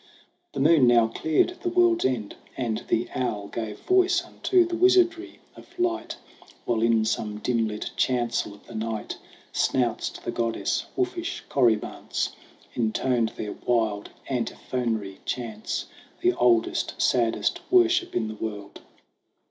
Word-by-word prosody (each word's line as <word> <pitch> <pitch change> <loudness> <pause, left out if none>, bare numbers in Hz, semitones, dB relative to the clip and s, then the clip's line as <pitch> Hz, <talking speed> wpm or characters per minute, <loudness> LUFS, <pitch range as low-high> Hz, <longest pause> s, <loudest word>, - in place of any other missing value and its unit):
The - - -4
moon 145 -2 +5
now 120 -2 +5
cleared 160 - +1
the 355 - -1
world's 355 -1 +3
end, 115 -6 -1 0.2
and 115 -4 -2
the 115 +1 +1
owl 110 -5 -2
Gave 110 -2 -5
voice 370 -1 +3
unto 360 +1 +2
the 345 0 -3
wizardry 355 -1 +3 0.2
of 350 - -16
light; 355 -1 -1 0.5
While 115 -2 0
in 115 -1 +3
some 105 -1 -2
dim 115 0 0
lit 105 0 -5
chancel 120 -5 0
of 100 - -20
the - - -12
night, 110 -1 -4 0.3
Snouts 120 -3 +1
to - - -12
the - - -1
goddess, 115 -1 -1
wolfish 360 -2 -2
corybants 115 -6 +1 0.4
Intoned 115 0 0
their 105 - -4
wild 110 -4 0 0.2
antiphonary 115 -5 -2
chants 110 -4 -3 0.4
The - - +3
oldest, 120 -2 +2
saddest 115 -2 +1
worship 360 0 +3
in 110 -2 0
the 110 - -5
world. 105 -2 -6
120 Hz, 135 wpm, -26 LUFS, -, 0.5 s, moon